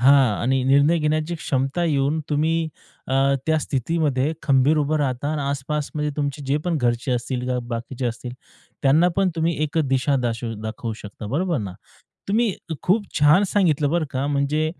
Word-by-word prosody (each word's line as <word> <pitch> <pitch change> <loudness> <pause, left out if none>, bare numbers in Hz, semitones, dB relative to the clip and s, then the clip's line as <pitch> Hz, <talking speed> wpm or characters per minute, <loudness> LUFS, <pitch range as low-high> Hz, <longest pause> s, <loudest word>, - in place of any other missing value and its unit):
हां 130 -4 +5
आणि 130 +2 +1
निर्णय 140 +5 +4
घेण्याची 155 +2 0
क्षमता 140 +2 -1
येऊन 145 0 +1
तुम्ही 160 +2 +1 0.4
अ, 135 +1 +3
त्या 160 0 +3
स्थितीमध्ये 145 0 0
खंबीर 140 +2 +3
उभं 150 +1 +1
राहता 135 0 -1
आणि 150 -2 -2
आसपास 140 +2 -2
म्हणजे 150 -1 -1
तुमचे 145 -1 -2
जे 140 +2 +2
पण 175 -3 0
घरचे 120 +1 0
असतील 125 +1 -2
किंवा 125 0 -1
बाकीचे 120 +2 -4
असतील, 120 +1 -5 0.5
त्यांना 150 +6 +5
पण 195 -1 +3
तुम्ही 165 +1 +1
एक 155 +2 -1
दिशा 135 +1 +2
दाशवू 115 -1 -2
दाखवू 110 +1 -4
शकता. 105 0 -9
बरोबर 165 - 0
ना? 100 -5 -5 0.6
तुम्ही 220 +1 +2 0.3
खूप 205 +3 +2
छान 150 +6 +6
सांगितलं 155 -7 +2
बरं 170 -1 +1
का. 135 +1 -2
म्हणजे 145 +2 +1
140 Hz, 165 wpm, -23 LUFS, 130-155 Hz, 0.6 s, छान